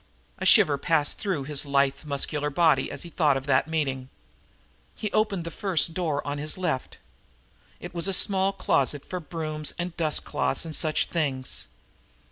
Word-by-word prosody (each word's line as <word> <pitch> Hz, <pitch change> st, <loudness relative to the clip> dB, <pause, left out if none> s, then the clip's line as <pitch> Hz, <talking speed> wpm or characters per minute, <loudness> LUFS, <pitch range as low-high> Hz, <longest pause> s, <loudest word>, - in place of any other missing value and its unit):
A -, -, 0 dB
shiver 145 Hz, -2 st, +6 dB
passed 150 Hz, -1 st, +1 dB
through 185 Hz, -10 st, -2 dB
his 145 Hz, 0 st, -3 dB
lithe, 140 Hz, 0 st, +1 dB
muscular 150 Hz, +1 st, -1 dB
body 150 Hz, -2 st, +3 dB
at 145 Hz, -, -5 dB
the 170 Hz, -, -7 dB
thought 150 Hz, -6 st, +2 dB
of 135 Hz, -, -6 dB
that 135 Hz, +1 st, +2 dB
meeting. 135 Hz, -5 st, -2 dB, 0.9 s
He 210 Hz, -, -4 dB
opened 210 Hz, -5 st, +1 dB
the 170 Hz, -, -6 dB
first 170 Hz, -3 st, 0 dB
door 160 Hz, -5 st, -1 dB
to 145 Hz, 0 st, -3 dB
his 150 Hz, +4 st, -2 dB
left. 165 Hz, -8 st, -2 dB, 0.8 s
It 175 Hz, +1 st, -8 dB
was 170 Hz, +1 st, 0 dB
a -, -, +1 dB
small 190 Hz, 0 st, +4 dB
closet 145 Hz, -6 st, 0 dB
for 180 Hz, -, -4 dB
brooms 155 Hz, -2 st, -4 dB
and 175 Hz, -1 st, -4 dB
dust 155 Hz, -3 st, 0 dB
cloths 135 Hz, -, -1 dB
and 160 Hz, -2 st, -4 dB
such 155 Hz, -2 st, +1 dB
things. 140 Hz, -6 st, -2 dB
155 Hz, 170 wpm, -26 LUFS, 140-175 Hz, 0.9 s, shiver